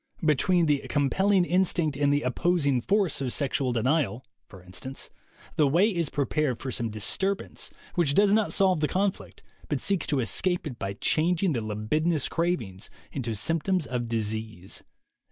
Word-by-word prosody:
"Between 165 +4 +3
the 145 -2 +2
compelling 185 +7 +2
instinct 175 -4 +1
and 145 0 +2
the 145 +1 +1
opposing 140 -1 +1
force 195 - +1
of 130 -2 -1
sexual 135 -2 0
denial," 130 +1 0 0.2
for 95 -3 -14
instance, 95 +9 -6 0.5
"the 150 - +5
way 180 +10 +3
is 165 -4 0
prepared 145 -2 0
for 130 - -4
some 115 -1 -2
disturbance 190 - -2 0.2
which 150 -5 +2
does 200 0 +5
not 215 -1 +2
solve 190 -4 +3
the 150 - +1
conflict 195 +3 -2 0.3
but - - 0
seeks 195 -3 0
to 145 - +1
escape 175 +10 +1
it 125 -6 -6
by 100 0 -3
changing 165 - +1
the 120 - -1
libidinous 130 +9 0
cravings 125 - -2 0.2
into 120 -5 -3
symptoms 165 - 0
of 125 -2 -3
disease." 110 -4 -3
145 Hz, 155 wpm, -27 LUFS, 120-175 Hz, 0.5 s, the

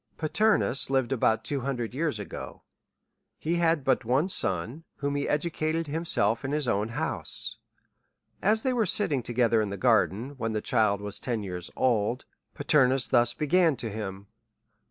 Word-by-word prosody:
Paternus 180 - +2
lived 135 -2 +1
about 110 -3 +1
t5VO 135 +4 -1
hundred 120 -3 -3
years 150 -3 -1
ago; 105 - -8 0.7
he 170 +2 -1
had 165 -3 +2
but 130 0 +1
one 130 +7 +2
son^ 115 - 0
whom 140 0 -3
he 145 0 -2
educated 155 +1 -1
himself 145 -8 +1
in 135 +2 -3
his 150 -3 0
own 105 0 0
house. 120 - -3 0.8
As 215 +3 +2
they 260 - +1
were 225 -5 +1
sitting 155 -9 +1
together 120 -1 +2
in 105 - -2
the 100 - -5
gar 115 -4 +4
den, 115 +9 -7
when 115 -2 -2
the 110 - 0
child 105 -3 +1
was 105 0 -5
ten 115 -4 -3
years 90 -2 -5
old^ 120 0 +1 0.3
Paternus 135 -3 +2
thus 120 -1 +4
began 165 0 +2
to 115 -3 -4
him. 100 -2 -6
130 Hz, 165 wpm, -27 LUFS, 110-150 Hz, 0.8 s, gar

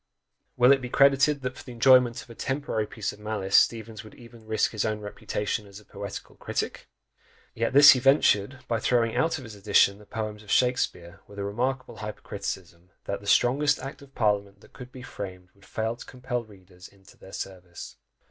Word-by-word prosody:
Will 125 +1 +6
it 135 -1 +4
be 125 - -5
credited 140 +1 +4
that 130 0 -3
for - - -11
the 125 - -10
enjoyment 125 +1 +4
of - - -21
a - - -9
temporary 130 -4 -2
piece 105 -1 -4
of - - -16
malice, 105 -2 -2
Steevens 110 -2 +2
would 110 - -14
even 115 -2 -15
risk 110 0 +1
his 110 - -2
own 110 -1 -1
reputation 105 +1 -4
as 100 +1 -12
a 105 - -20
poetical 100 -1 -8
critic? - - -4 0.7
Yet 115 +2 -1
this 140 +1 +10
he 130 - +3
ventured, 130 -2 +3
by 115 -1 0
throwing 115 -1 +1
out 165 0 +1
of 135 - -9
his 115 -3 -10
edition 100 0 +3
the 105 - -17
poems 110 -1 -5
of 105 - -16
Shakspeare, 100 -8 0
with 100 - -14
a 100 - -3
remarkable 125 +6 -3
hyper 105 0 -7
criticism, 90 -3 -7 0.2
that 100 - -4
"the 100 - -12
strongest 140 +7 +3
act 135 +2 -8
of 135 -1 -17
parliament 100 -3 0
that - - -20
could 125 -1 -11
be 130 -1 -11
framed 90 -6 -8
would 100 0 -22
fail 110 +1 -2
to - - -11
compel 125 -1 -4
readers 95 -4 -16
into 95 -1 -21
their 95 - -15
service." 90 -3 -8
110 Hz, 205 wpm, -26 LUFS, 100-125 Hz, 0.7 s, this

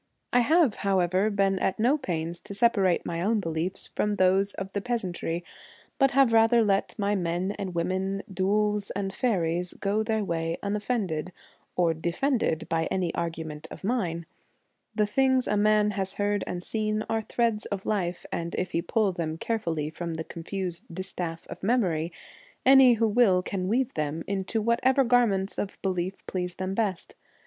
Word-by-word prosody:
I 245 - +6
have, 295 -1 +3
however, 190 +1 +2
been 195 -2 +1
at 190 - 0
no 245 +6 +3
pains 170 - -3
to 200 - -8
separate 200 -5 +3
my 170 0 -3
own 215 +4 +2
beliefs 170 +1 -2
from 210 0 +1
those 190 +1 +3
of 195 0 -5
the 200 - -2
peasantry, 185 -7 -2 0.6
but 270 -1 +5
have 265 -4 +5
rather 225 +1 +5
let 195 -2 0
my 205 -1 +1
men 180 0 -1
and 190 -3 -4
women, 190 +3 -1
dhouls 205 +2 0
and 195 -1 -2
faeries, 180 -7 0
go 205 +2 0
their 220 -1 0
way 165 -2 -2
unoffended 200 -5 -2 0.4
or 170 -2 +3
defended 170 - 0
by 165 0 0
any 185 -3 -1
argument 160 -2 -4
of - - -10
mine. 180 -7 -1 0.7
The 210 - +3
things 260 +4 +2
a 210 - +1
man 210 0 +3
has 195 -2 -3
heard 205 -1 0
and 175 0 -4
seen 215 0 -1
are 225 0 0
threads 225 -1 0
of 195 -2 -4
life, 180 -4 -1
and 170 0 -3
if 185 - -2
he 170 - 0
pull 205 +3 +1
them 165 -3 -3
care 225 +6 -1
fully 155 -5 -2
from 170 0 -4
the 160 - -3
confused 175 +1 -5
distaff 175 -2 -5
of - - -9
memory, 185 -7 +1 0.5
any 265 -2 +8
who 225 0 +2
will 205 -5 +4
can 185 -1 -3
weave 245 +5 +1
them 155 +1 -2
into 200 +3 -2
what 235 +1 +2
ever 265 +1 +4
garments 230 -6 +2
of 200 - -4
belief 185 0 -2
please 180 -1 -3
them 185 0 -3
best. 195 -4 -2
195 Hz, 175 wpm, -27 LUFS, 175-215 Hz, 0.7 s, any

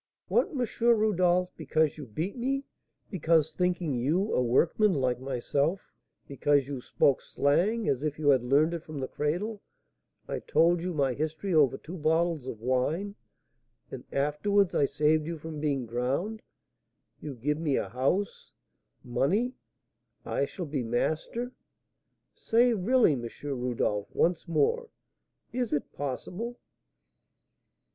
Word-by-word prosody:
"What, - - +3
M. 255 -6 -1 0.2
Rodolph, 185 -6 +3
because 155 -2 +1
you 145 - -7
beat 160 - -3
me, 270 +3 -1 0.5
because, 160 -4 +2
thinking 180 -3 0
you 155 - 0
a - - +3
workman, 165 - +3
like 125 -3 0
myself, 140 +6 -1 0.5
because 140 0 +2
you 140 -3 -5
spoke 135 +2 +2
'slang' 185 +11 +1
as 135 -1 +1
if 150 -1 -2
you 150 -2 +2
had 130 -3 +4
learned 145 +6 +3
it 170 - -3
from 155 -3 -7
the 130 - -2
cradle, 190 +9 -2 0.7
I - - -3
told 165 +2 +3
you 180 -1 -3
my 135 -3 +1
history 160 +7 -3
over 145 -6 +4
two 175 +4 -9
bottles 160 -2 +1
of 115 - -5
wine, 140 - 0 0.8
and 130 - -7
afterwards 170 +8 +1
I 140 - +3
saved 150 +2 +1
you 170 -1 -4
from 155 0 -7
being 140 -4 -1
drowned, 135 - -2 0.8
you 145 -3 -6
give 150 +6 -1
me 150 -4 +1
a - - -1
house 140 +11 -1 0.5
money 195 - +1 0.7
I 140 - 0
shall 175 +5 -6
be 145 -3 -2
master! 155 - -2 0.8
Say 240 +2 +3
really, 225 - +3
M. 120 -3 -4
Rodolph, 125 -7 -1
once 175 +1 +1
more, 465 - +1 0.6
is 245 -3 -1
it 145 - -2
possible?" 180 - -4
155 Hz, 135 wpm, -29 LUFS, 140-190 Hz, 0.8 s, had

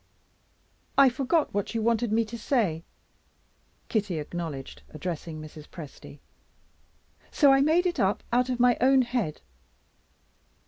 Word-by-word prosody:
I 275 -1 +7
forgot 275 +5 0
what 205 +3 -2
you 225 - 0
wanted 230 0 +1
me 225 +1 +2
to 220 +2 -8
say," 215 - 0 1.0
Kitty 205 -6 -1
acknowledged, 150 - -6
addressing 165 - -5
Mrs. 155 0 -11
Presty; 150 -2 -11 1.1
"so 280 -3 +5
I 270 - +4
made 320 +5 +3
it 355 - -1
up 195 +1 +1
out 250 +1 +2
of 250 -1 -2
my 245 -1 +4
own 265 +1 +5
head." 240 -10 -3
225 Hz, 130 wpm, -27 LUFS, 165-255 Hz, 1.1 s, I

